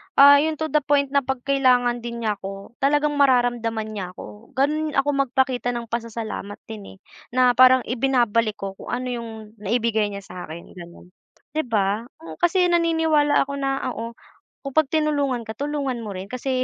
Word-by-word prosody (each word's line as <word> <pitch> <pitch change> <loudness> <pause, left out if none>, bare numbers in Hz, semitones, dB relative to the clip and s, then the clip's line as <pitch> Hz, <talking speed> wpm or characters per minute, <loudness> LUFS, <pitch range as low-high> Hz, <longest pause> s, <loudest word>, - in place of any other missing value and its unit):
Ah, 285 0 +9
'yung 315 +1 0
to 315 +1 -4
the 300 - +4
point 280 -1 +1
na 280 - +4
'pag 265 -2 -4
kailangan 250 -3 +3
din 235 0 -6
niya 210 -2 -1
ko 195 +2 -8
talagang 295 +2 +2
mararamdaman 240 -4 +2
niya 185 -4 -6
ako, 210 +6 -12
gano'n 300 +3 0
ako 275 +1 +2 0.2
magpakita 250 -1 0
ng 235 -1 -6
pasasalamat 225 -3 -4
din, 210 -3 -10
eh. - - -23 0.4
Na 250 -1 +5
parang 255 +1 +6
ibinabalik 235 -4 +1
ko 195 0 -5
kung 190 - -13
ano 250 +1 -3
'yung 235 -1 -5 0.3
naibigay 220 0 0
niya 200 -1 -7
sa'kin 170 -3 -9
gano'n, 175 +1 -13 0.4
'di 315 +1 -1
ba? 210 +1 0 0.3
Kasi 355 0 +3
naniniwala 320 -4 +3
ako 280 - -7
na 270 0 -1
oo, 230 +1 -6 0.5
kung 275 - -5
pag 315 -2 +4
tinulungan 285 -6 0
ka 220 - -7
tulungan 280 -4 -2
mo 210 -4 -6
rin 190 +4 -7
kasi, 255 0 -1
245 Hz, 175 wpm, -23 LUFS, 220-280 Hz, 0.5 s, Ah